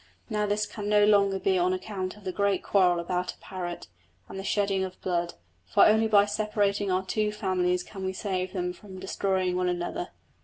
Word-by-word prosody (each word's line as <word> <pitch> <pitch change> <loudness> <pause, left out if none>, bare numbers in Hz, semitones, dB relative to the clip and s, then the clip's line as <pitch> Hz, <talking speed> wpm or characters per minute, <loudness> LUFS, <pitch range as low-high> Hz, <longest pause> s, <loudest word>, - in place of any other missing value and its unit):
Now 210 -1 0
this 210 +1 0
can 210 -1 -6
no 210 0 +5
longer 200 -2 +4
be 190 -1 +1
on 180 +1 +2
account 185 0 -4
of 210 - -16
the 185 - -3
great 200 0 0
quarrel 180 -3 +3
about 180 +1 -2
a - - -30
parrot, 175 -2 -6 0.4
and 195 - -7
the - - -5
shedding 200 -1 +1
of 185 -1 -6
blood; 175 -2 -1 0.3
for - - +5
only 220 +1 +4
by 205 -2 +5
separating 205 -1 0
our 185 +1 0
two 210 +2 0
families 180 -3 0
can 195 0 -9
we 190 - -1
save 185 -1 -2
them 180 -2 -2
from 190 0 -11
destroying 190 -1 -1
one 180 0 +1
another. 180 - -3
190 Hz, 200 wpm, -27 LUFS, 185-205 Hz, 0.4 s, no